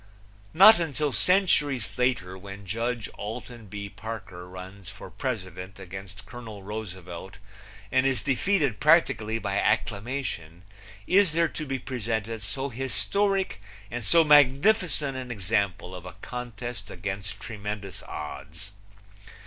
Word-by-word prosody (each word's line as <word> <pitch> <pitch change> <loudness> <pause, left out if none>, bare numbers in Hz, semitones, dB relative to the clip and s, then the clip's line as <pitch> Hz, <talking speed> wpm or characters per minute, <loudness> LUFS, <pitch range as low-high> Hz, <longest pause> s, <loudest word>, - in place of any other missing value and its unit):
Not 205 +5 +10
until 150 -3 0
centuries 150 - +3
later, 125 -8 +1
when 100 +1 -9
Judge 115 +3 -2
Alton 115 +1 -6
B. 100 +1 -5
Parker 95 -4 -7
runs 95 +1 -9
for - - -10
president 95 -6 -4
against 95 +1 -9
Colonel 110 -5 -9
Roosevelt 95 -2 -7 0.5
and 130 - +4
is 135 -5 +1
defeated 140 - +2
practically 140 -8 +4
by 100 -3 -1
acclamation 105 - -1 0.4
is 190 -4 +5
there 165 0 +3
to 155 - -5
be 135 0 -1
presented 115 -3 -3
so 135 +8 -2
historic 190 - 0 0.3
and 120 0 -3
so 165 +8 +6
magnificent 150 - +5
an 130 -1 -5
example 100 -4 -1
of 90 -1 -7
a 90 - -8
contest 120 -1 -6
against 95 +2 -4
tremendous 105 -3 -5
odds. 80 +5 -7
110 Hz, 120 wpm, -27 LUFS, 95-135 Hz, 0.5 s, Not